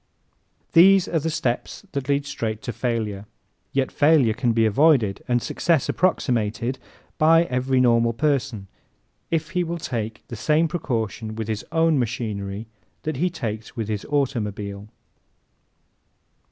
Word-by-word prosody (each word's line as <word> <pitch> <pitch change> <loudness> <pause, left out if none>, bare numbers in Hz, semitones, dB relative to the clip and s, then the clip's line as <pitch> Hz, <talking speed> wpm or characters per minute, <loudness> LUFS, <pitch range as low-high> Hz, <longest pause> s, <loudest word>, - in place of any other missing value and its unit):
These 185 +2 +7
are 165 - 0
the 160 +2 -2
steps 155 - -2
that 140 -1 -4
lead 140 0 +1
straight 110 -6 -4
to 120 - -4
failure. 110 -5 -2 0.4
Yet 135 -1 0
failure 145 -7 +4
can 120 +1 0
be 115 0 +3
avoided 115 -3 +3
and 120 -1 +1
success 165 -6 +1
approximated 125 - 0 0.4
by 165 +2 +6
every 130 -2 0
normal 115 -2 +4
person 130 -6 -1 0.6
if 160 -2 -1
he 180 -1 +1
will 170 0 -3
take 115 -7 -4
the 120 - -7
same 150 +9 +2
precaution 115 - -3
with 110 -1 -4
his 110 -2 -3
own 165 -2 +3
machinery 110 -4 -3 0.4
that 155 -3 -3
he 180 +6 +1
takes 110 -10 -5
with 110 -2 -3
his 105 -2 -2
automobile. 105 -8 -2
125 Hz, 140 wpm, -23 LUFS, 110-155 Hz, 0.6 s, These